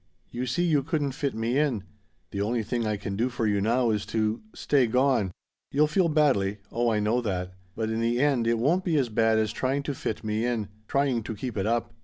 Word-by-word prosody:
You 125 Hz, +1 st, -3 dB
see 135 Hz, +8 st, 0 dB
you 155 Hz, -5 st, +3 dB
couldn't 145 Hz, -1 st, -1 dB
fit 140 Hz, 0 st, -2 dB
me 115 Hz, +4 st, 0 dB
in. 130 Hz, -10 st, 0 dB, 0.5 s
The 100 Hz, -, -2 dB
only 115 Hz, +2 st, 0 dB
thing 115 Hz, +1 st, -1 dB
I 105 Hz, -1 st, 0 dB
can 100 Hz, -1 st, -4 dB
do 120 Hz, +5 st, +1 dB
for 120 Hz, -2 st, -2 dB
you 100 Hz, -2 st, +2 dB
now 115 Hz, +2 st, +2 dB
is 105 Hz, -1 st, 0 dB
to 110 Hz, 0 st, 0 dB
stay 135 Hz, -4 st, +2 dB
gone. 125 Hz, -5 st, +2 dB, 0.4 s
You'll 150 Hz, +2 st, +4 dB
feel 170 Hz, +3 st, +2 dB
badly 130 Hz, -11 st, +2 dB
oh, 120 Hz, +1 st, +1 dB
I 110 Hz, -2 st, +1 dB
know 110 Hz, +4 st, +1 dB
that 90 Hz, -4 st, -3 dB, 0.2 s
but 110 Hz, 0 st, -2 dB
in 110 Hz, -, -1 dB
the 120 Hz, +1 st, +1 dB
end 135 Hz, -5 st, +2 dB
it 115 Hz, 0 st, +2 dB
won't 160 Hz, +11 st, +2 dB
be 170 Hz, -4 st, +1 dB
as 130 Hz, -4 st, +1 dB
bad 110 Hz, 0 st, +3 dB
as 110 Hz, -1 st, 0 dB
trying 135 Hz, +2 st, -1 dB
to 140 Hz, -, -2 dB
fit 115 Hz, -4 st, -4 dB
me 110 Hz, +1 st, -1 dB
in, 115 Hz, -4 st, -1 dB, 0.2 s
trying 135 Hz, -4 st, +1 dB
to 110 Hz, 0 st, -5 dB
keep 120 Hz, +3 st, -5 dB
it 100 Hz, 0 st, -1 dB
up. 115 Hz, +1 st, 0 dB
120 Hz, 235 wpm, -27 LUFS, 110-135 Hz, 0.5 s, You'll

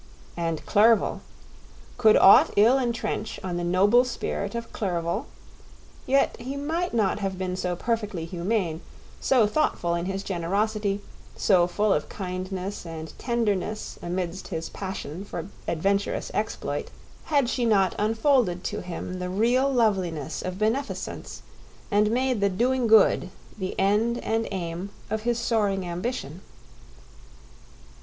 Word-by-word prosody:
And 165 Hz, -2 st, -2 dB
Clerval—could 220 Hz, +1 st, +1 dB
aught 195 Hz, -, +8 dB
ill 235 Hz, +6 st, +6 dB
entrench 235 Hz, -3 st, -2 dB
on 180 Hz, -2 st, -3 dB
the 175 Hz, -, -2 dB
noble 200 Hz, +8 st, +4 dB
spirit 235 Hz, -4 st, -3 dB
of 235 Hz, 0 st, -5 dB
Clerval? 180 Hz, +4 st, -2 dB, 0.8 s
Yet 275 Hz, +1 st, +3 dB
he 260 Hz, +3 st, -5 dB
might 325 Hz, +5 st, -2 dB
not 210 Hz, -3 st, +1 dB
have 195 Hz, -2 st, -2 dB
been 185 Hz, -1 st, -2 dB
so 180 Hz, -1 st, -2 dB
perfectly 210 Hz, -5 st, -2 dB
humane, 175 Hz, -1 st, -1 dB, 0.4 s
so 250 Hz, -5 st, +4 dB
thoughtful 210 Hz, -, 0 dB
in 170 Hz, 0 st, -1 dB
his 195 Hz, +1 st, -3 dB
generosity, 200 Hz, +3 st, -1 dB, 0.3 s
so 180 Hz, -4 st, +4 dB
full 205 Hz, +3 st, +1 dB
of -, -, -2 dB
kindness 185 Hz, +1 st, -5 dB
and 160 Hz, -2 st, -7 dB
tenderness 215 Hz, -3 st, -1 dB
amidst 175 Hz, +1 st, -3 dB
his 165 Hz, -3 st, -4 dB
passion 190 Hz, -3 st, -6 dB
for 180 Hz, -2 st, -6 dB, 0.2 s
adventurous 195 Hz, +5 st, 0 dB
exploit, -, -, -2 dB, 0.4 s
had 285 Hz, -5 st, +2 dB
she 250 Hz, 0 st, -1 dB
not 200 Hz, -6 st, +3 dB
unfolded 220 Hz, -4 st, +2 dB
to 210 Hz, -, -3 dB
him 180 Hz, +1 st, -6 dB
the 180 Hz, 0 st, -3 dB
real 240 Hz, +8 st, +2 dB
loveliness 190 Hz, -, 0 dB
of 185 Hz, 0 st, -4 dB
beneficence 225 Hz, +7 st, -3 dB, 0.5 s
and 210 Hz, +1 st, +3 dB
made 250 Hz, -1 st, +1 dB
the 200 Hz, -, +3 dB
doing 245 Hz, +5 st, +1 dB
good 215 Hz, -4 st, +5 dB, 0.3 s
the 190 Hz, -3 st, -4 dB
end 210 Hz, +5 st, +2 dB
and 225 Hz, 0 st, 0 dB
aim 180 Hz, 0 st, -4 dB, 0.2 s
of 220 Hz, 0 st, -1 dB
his 240 Hz, +1 st, 0 dB
soaring 205 Hz, -5 st, 0 dB
ambition. 175 Hz, -, -4 dB
200 Hz, 130 wpm, -26 LUFS, 180-230 Hz, 0.8 s, aught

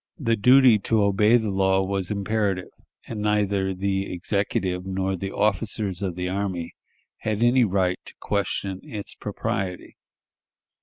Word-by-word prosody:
The 115 Hz, -5 st, +1 dB
duty 125 Hz, +1 st, +6 dB
to 110 Hz, +1 st, +1 dB
obey 105 Hz, +4 st, +4 dB
the 110 Hz, -3 st, -2 dB
law 95 Hz, 0 st, +2 dB
was 95 Hz, -1 st, -2 dB
imperative, 100 Hz, -2 st, -1 dB, 0.3 s
and 110 Hz, -3 st, -5 dB
neither 100 Hz, -2 st, +1 dB
the 95 Hz, +1 st, -1 dB
Executive 90 Hz, 0 st, -1 dB
nor 95 Hz, 0 st, -2 dB
the 95 Hz, +2 st, -5 dB
officers 100 Hz, -2 st, -1 dB
of 95 Hz, -3 st, -2 dB
the 90 Hz, 0 st, -3 dB
army 95 Hz, -3 st, -3 dB, 0.5 s
had 110 Hz, +1 st, -1 dB
any 125 Hz, +1 st, +5 dB
right 90 Hz, -2 st, 0 dB
to -, -, -9 dB
question 100 Hz, -1 st, -2 dB
its 105 Hz, -2 st, -6 dB
propriety. 95 Hz, -2 st, -4 dB
100 Hz, 140 wpm, -24 LUFS, 95-105 Hz, 0.5 s, duty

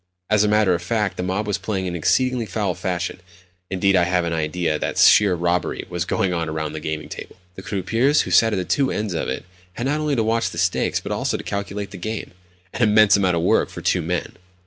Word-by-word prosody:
As 105 Hz, -1 st, +4 dB
a -, -, +2 dB
matter 105 Hz, -3 st, +3 dB
of 85 Hz, -, -1 dB
fact, 105 Hz, +2 st, -1 dB
the -, -, -4 dB
mob 95 Hz, +4 st, -2 dB
was 105 Hz, -1 st, -1 dB
playing 95 Hz, -3 st, -3 dB
in 90 Hz, -1 st, -3 dB
exceedingly 125 Hz, +7 st, +1 dB
foul 100 Hz, -1 st, -1 dB
fashion. 90 Hz, 0 st, -3 dB, 0.5 s
Indeed, 95 Hz, 0 st, +2 dB
I 90 Hz, -1 st, +4 dB
have 90 Hz, 0 st, +1 dB
an 85 Hz, -, -2 dB
idea 80 Hz, 0 st, -1 dB
that -, -, -3 dB
sheer 100 Hz, -3 st, +6 dB
robbery 85 Hz, +1 st, -1 dB
was 85 Hz, -1 st, -2 dB
going 90 Hz, 0 st, 0 dB
on 85 Hz, -2 st, -2 dB
around 80 Hz, -1 st, -3 dB
that 80 Hz, -, -5 dB
gaming 80 Hz, 0 st, -4 dB
table. -, -, -9 dB, 0.2 s
The 95 Hz, -, -9 dB
croupiers 115 Hz, -, +1 dB
who -, -, -5 dB
sat 115 Hz, 0 st, +5 dB
at -, -, 0 dB
the 95 Hz, -2 st, -2 dB
two 135 Hz, +8 st, +1 dB
ends 105 Hz, -3 st, -2 dB
of 80 Hz, -, -2 dB
it -, -, -4 dB, 0.3 s
had 120 Hz, -, -4 dB
not 145 Hz, +3 st, 0 dB
only 150 Hz, -2 st, 0 dB
to 115 Hz, -, +1 dB
watch 115 Hz, +1 st, +1 dB
the -, -, -9 dB
stakes, 90 Hz, +1 st, +1 dB
but -, -, -7 dB
also -, -, -1 dB
to -, -, -8 dB
calculate 100 Hz, 0 st, -4 dB
the -, -, -8 dB
game—an 90 Hz, -1 st, -8 dB
immense 110 Hz, -2 st, +6 dB
amount 95 Hz, -3 st, +2 dB
of 85 Hz, -, -1 dB
work -, -, +2 dB
for -, -, -8 dB
two 90 Hz, -, +1 dB
men! 85 Hz, +2 st, -2 dB
95 Hz, 235 wpm, -22 LUFS, 90-110 Hz, 0.5 s, sheer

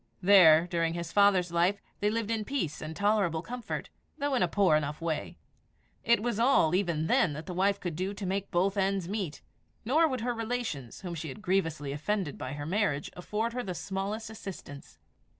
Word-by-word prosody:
There, 175 Hz, -4 st, +7 dB
during 170 Hz, -1 st, -1 dB
his 170 Hz, -1 st, -4 dB
father's 195 Hz, -4 st, +4 dB
life, 175 Hz, +4 st, +2 dB, 0.2 s
they 205 Hz, -, +2 dB
lived 225 Hz, 0 st, -2 dB
in 220 Hz, -1 st, 0 dB
peace 210 Hz, -, -3 dB
and 155 Hz, +1 st, -6 dB
tolerable 200 Hz, -5 st, +1 dB
comfort, 245 Hz, +2 st, -5 dB, 0.3 s
though 285 Hz, 0 st, -1 dB
in 255 Hz, -, +2 dB
a 180 Hz, -, +4 dB
poor 190 Hz, -3 st, +3 dB
enough 150 Hz, 0 st, -1 dB
way. 165 Hz, -2 st, -3 dB, 0.7 s
It 235 Hz, -2 st, +3 dB
was 235 Hz, -3 st, -1 dB
all, 230 Hz, -, +4 dB
even 170 Hz, -5 st, +1 dB
then, 160 Hz, -1 st, +3 dB
that 155 Hz, +2 st, -7 dB
the 180 Hz, -, -5 dB
wife 195 Hz, +2 st, +1 dB
could 175 Hz, -5 st, -4 dB
do 185 Hz, +4 st, -2 dB
to 195 Hz, -, -5 dB
make 195 Hz, +1 st, -2 dB
both 190 Hz, +3 st, +1 dB
ends 195 Hz, -2 st, 0 dB
meet; 195 Hz, -6 st, -4 dB, 0.4 s
nor 310 Hz, +8 st, +4 dB
would 260 Hz, -5 st, -3 dB
her 245 Hz, +1 st, -1 dB
relations, 225 Hz, -, -4 dB
whom 180 Hz, -3 st, -5 dB
she 165 Hz, -1 st, -5 dB
had 165 Hz, +10 st, -9 dB
grievously 165 Hz, -7 st, 0 dB
offended 155 Hz, +2 st, -2 dB
by 130 Hz, +1 st, -4 dB
her 145 Hz, 0 st, -5 dB
marriage, 165 Hz, -5 st, 0 dB
afford 210 Hz, +6 st, -2 dB
her 250 Hz, -, -2 dB
the 185 Hz, -6 st, -5 dB
smallest 200 Hz, +4 st, -4 dB
assistance. 185 Hz, -9 st, -9 dB
190 Hz, 195 wpm, -29 LUFS, 165-210 Hz, 0.7 s, There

